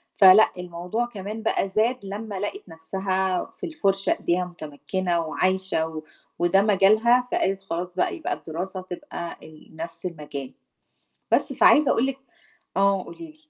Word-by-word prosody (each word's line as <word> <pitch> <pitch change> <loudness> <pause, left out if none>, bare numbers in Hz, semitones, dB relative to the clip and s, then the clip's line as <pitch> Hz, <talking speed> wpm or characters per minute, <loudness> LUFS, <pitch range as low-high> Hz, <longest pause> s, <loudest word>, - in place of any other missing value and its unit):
فلأ 195 +2 +8
الموضوع 180 +6 -3
كمان 215 -1 -7
بقى 195 -3 +1
زاد 220 +2 0
لمّا 205 0 -5
لقِت 395 - -4
نَفْسها 190 +2 -1
في 380 - -7
الفُرشة 195 - 0
إيديها 180 +1 0
مُتمكِّنة 175 +2 -3
وعايشة 185 0 0
و 160 -1 -7 0.4
وده 175 +3 +4
مجالها، 215 +5 +4
فقالت 195 0 0
خلاص 180 -1 -4
بقى 185 - 0
يبقى 325 - -3
الدراسة 185 +4 -5
تبقى 180 - -7
ال 155 0 -15
نَفْس 165 +2 -7
المجال. 150 -6 -6 0.8
بس، - - +2
فعايزة 295 0 +6
أقول 235 - +2
لِك 270 -1 -2 0.6
آه، 195 -1 +3
قولي - - -11
لي. 310 -1 -14
190 Hz, 140 wpm, -24 LUFS, 175-215 Hz, 0.8 s, فلأ